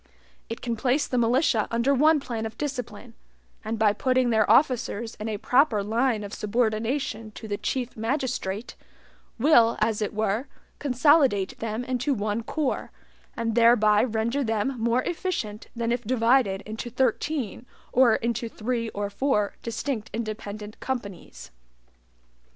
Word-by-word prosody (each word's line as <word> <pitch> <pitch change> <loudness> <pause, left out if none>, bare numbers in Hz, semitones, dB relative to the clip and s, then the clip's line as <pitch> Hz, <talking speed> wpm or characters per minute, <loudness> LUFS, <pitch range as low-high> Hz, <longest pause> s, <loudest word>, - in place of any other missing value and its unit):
It 230 - -5
can 235 -2 -2
place 255 +6 +1
the 250 - -1
militia 235 -1 +2
under 235 +4 +2
one 305 +3 +4
plan 230 -4 -4
of 220 - -12
discipline, 250 -5 -5 0.5
and, 220 +1 -3
by 215 -1 +3
putting 255 +2 +1
their 220 -2 +3
officers 235 -3 +2
in 215 +1 -3
a 215 - -2
proper 245 -2 +3
line 225 +1 0
of 200 +1 -7
subordination 225 +2 -1
to 220 - -9
the 205 -1 -3
Chief 250 -2 -3
Magistrate, 230 -3 -3 0.6
will, 235 -3 +5
as 220 0 +1
it 210 - -1
were, 220 +4 0 0.3
consolidate 265 -7 +3
them 225 +1 -3
into 255 +2 -1
one 210 +1 -1
corps, 285 +4 -2 0.5
and 230 -1 -1
thereby 220 -3 +5
render 235 +4 0
them 225 +2 0
more 235 +2 +2
efficient 325 - -3
than 235 0 -1
if 240 0 0
divided 230 -3 +2
into 220 +3 -6
thirteen 255 -1 -1 0.3
or 245 -3 +5
into 235 0 -2
three 230 +1 -2
or 205 0 -2
four 210 -3 0
distinct 230 0 -3
independent 215 -2 -6
companies. 200 - -6
230 Hz, 140 wpm, -26 LUFS, 215-255 Hz, 0.6 s, will